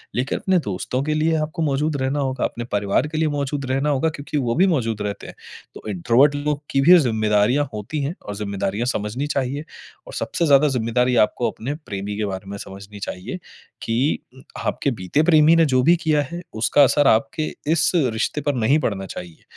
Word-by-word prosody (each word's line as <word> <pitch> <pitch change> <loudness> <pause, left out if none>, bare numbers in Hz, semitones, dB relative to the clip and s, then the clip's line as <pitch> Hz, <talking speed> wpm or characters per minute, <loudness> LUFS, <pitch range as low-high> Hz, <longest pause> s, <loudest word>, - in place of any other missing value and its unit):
लेकिन 130 +3 -1
अपने 190 -1 +2
दोस्तों 105 - -3
के 155 +1 -1
लिए 160 +1 +2
आपको 155 +2 -4
मौजूद 145 +1 0
रहना 135 +2 -1
होगा, 130 -2 -2
अपने 120 - -4
परिवार 105 +7 +1
के 155 - -4
लिए 160 - +2
मौजूद 140 0 -2
रहना 135 +3 +1
होगा 145 +3 +1
क्योंकि 150 0 -5
वो 120 -4 0
भी 185 +4 +4
मौजूद 115 - 0
रहते 105 -1 -4
हैं। - - -10 0.4
तो - - -9
इंट्रोवर्ट 120 +9 +3
लोग 145 0 -2
की 135 - +2
भी 175 +5 +8
ज़िम्मेदारियाँ 110 +2 +2
होती 110 +9 -4
हैं 145 +4 -2
और 105 - -5
ज़िम्मेदारियाँ 100 +2 -2
समझनी 120 +4 -2
चाहिए। 140 0 -2 0.4
और - - -10
सबसे 170 - -1
ज़्यादा 140 +1 +5
ज़िम्मेदारी 125 0 +1
आपको 120 - -2
अपने 135 +6 -5
प्रेमी 100 -1 -4
के 105 - -1
बारे 95 0 -6
में 100 - -5
समझनी 100 +1 -10
चाहिए 90 -2 -6 0.4
कि 120 +6 0 0.4
आपके 140 - -1
बीते 110 - 0
प्रेमी 160 -1 +5
ने 165 -1 +5
जो 130 -3 +2
भी 170 +4 +5
किया 155 -2 +2
है 175 - -5 0.2
उसका 145 +5 +5
असर 145 +1 +4
आपके 140 +7 +2 0.2
इस 165 - +3 0.2
रिश्ते 120 +6 -2
पर 145 0 -1
नहीं 125 +6 +3
पड़ना 100 -9 -2
चाहिए। 85 -3 -9
130 Hz, 195 wpm, -22 LUFS, 105-150 Hz, 0.4 s, भी